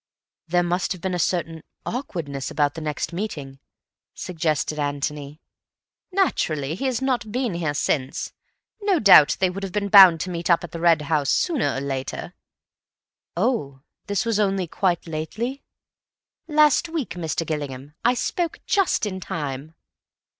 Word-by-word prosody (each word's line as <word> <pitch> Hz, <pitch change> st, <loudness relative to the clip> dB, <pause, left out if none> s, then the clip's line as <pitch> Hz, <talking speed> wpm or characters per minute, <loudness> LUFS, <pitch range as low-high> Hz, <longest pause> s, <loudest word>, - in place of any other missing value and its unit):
"There 175 Hz, +1 st, +2 dB
must 175 Hz, +2 st, 0 dB
have 180 Hz, -, -12 dB
been 190 Hz, 0 st, -2 dB
a 180 Hz, -, -1 dB
certain 165 Hz, -2 st, -1 dB, 0.2 s
awkwardness 165 Hz, -, -4 dB
about 145 Hz, -2 st, +1 dB
the 165 Hz, -, -7 dB
next 150 Hz, +2 st, -3 dB
meeting," 145 Hz, -9 st, -5 dB, 0.6 s
suggested 155 Hz, -3 st, -2 dB
Antony. 145 Hz, +1 st, -3 dB, 0.7 s
"Naturally, 155 Hz, -, 0 dB
he 230 Hz, +11 st, -4 dB
has 260 Hz, -1 st, -1 dB
not 240 Hz, -5 st, -1 dB
been 245 Hz, -3 st, -1 dB
here 160 Hz, -4 st, -2 dB
since. 135 Hz, -2 st, -1 dB, 0.5 s
No 405 Hz, -3 st, +2 dB
doubt 190 Hz, -, +7 dB
they 185 Hz, -1 st, +2 dB
would 195 Hz, +2 st, -6 dB
have 195 Hz, -2 st, -4 dB
been 200 Hz, +1 st, -2 dB
bound 190 Hz, -5 st, +9 dB
to 185 Hz, -, -3 dB
meet 170 Hz, 0 st, -4 dB
up 170 Hz, 0 st, +4 dB
at 170 Hz, -, -7 dB
the 170 Hz, -, -6 dB
Red 165 Hz, -2 st, +4 dB
House 145 Hz, -1 st, 0 dB
sooner 320 Hz, -9 st, +1 dB
or 135 Hz, -, -3 dB
later." 135 Hz, -1 st, -4 dB, 1.0 s
"Oh,—this 195 Hz, -, -2 dB
was 225 Hz, -2 st, 0 dB
only 195 Hz, -3 st, +1 dB
quite 175 Hz, +1 st, -1 dB
lately?" 205 Hz, -, -4 dB, 0.9 s
"Last 305 Hz, +1 st, +4 dB
week, 320 Hz, -, -3 dB
Mr. 165 Hz, -1 st, -3 dB
Gillingham. 145 Hz, -2 st, -5 dB
I 245 Hz, +2 st, +3 dB
spoke 340 Hz, +6 st, -2 dB
just 390 Hz, -, +2 dB
in 190 Hz, -2 st, -4 dB
time." 150 Hz, -2 st, -5 dB
175 Hz, 150 wpm, -23 LUFS, 150-215 Hz, 1.0 s, bound